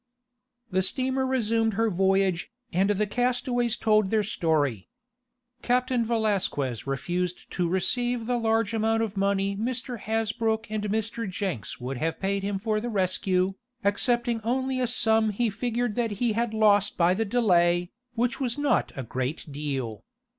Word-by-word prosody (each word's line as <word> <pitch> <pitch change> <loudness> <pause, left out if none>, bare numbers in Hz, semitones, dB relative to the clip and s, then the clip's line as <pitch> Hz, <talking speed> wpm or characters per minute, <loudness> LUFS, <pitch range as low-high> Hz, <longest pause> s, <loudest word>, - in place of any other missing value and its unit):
The 185 +1 +2
steamer 260 +6 +1
resumed 225 -4 +1
her 225 +1 +1
voyage, 190 -1 +1 0.2
and 190 +3 +2
the 205 +1 +2
castaways 245 +1 0
told 215 -3 +3
their 215 0 +2
story. 150 - 0 0.7
Captain 250 0 +1
Valasquez 200 - -1
refused 175 +6 -3
to 175 -2 0
receive 240 +6 0
the 245 +1 0
large 225 -1 +1
amount 225 0 +1
of 215 -2 -4
money 195 0 +1
Mr. 245 +2 -3
Hasbrook 220 0 -1
and 215 -1 -2
Mr. 220 +1 -2
Jenks 185 - -4
would 125 +1 -4
have 160 +4 -2
paid 195 +1 0
him 200 0 -2
for 215 +1 0
the 240 - -3
rescue, 185 -2 +1 0.3
accepting 235 +3 +1
only 260 +3 0
a 250 - +1
sum 220 -2 +2
he 220 +2 0
figured 240 +2 -1
that 230 -1 -1
he 225 +2 0
had 230 +1 0
lost 210 -2 +3
by 175 +1 +4
the 215 +4 0
delay, 175 -6 +2 0.2
which 240 +1 0
was 255 -1 -1
not 290 -1 +1
a 135 - -4
great 130 +5 -3
deal. 135 -6 -4
215 Hz, 155 wpm, -26 LUFS, 185-235 Hz, 0.7 s, by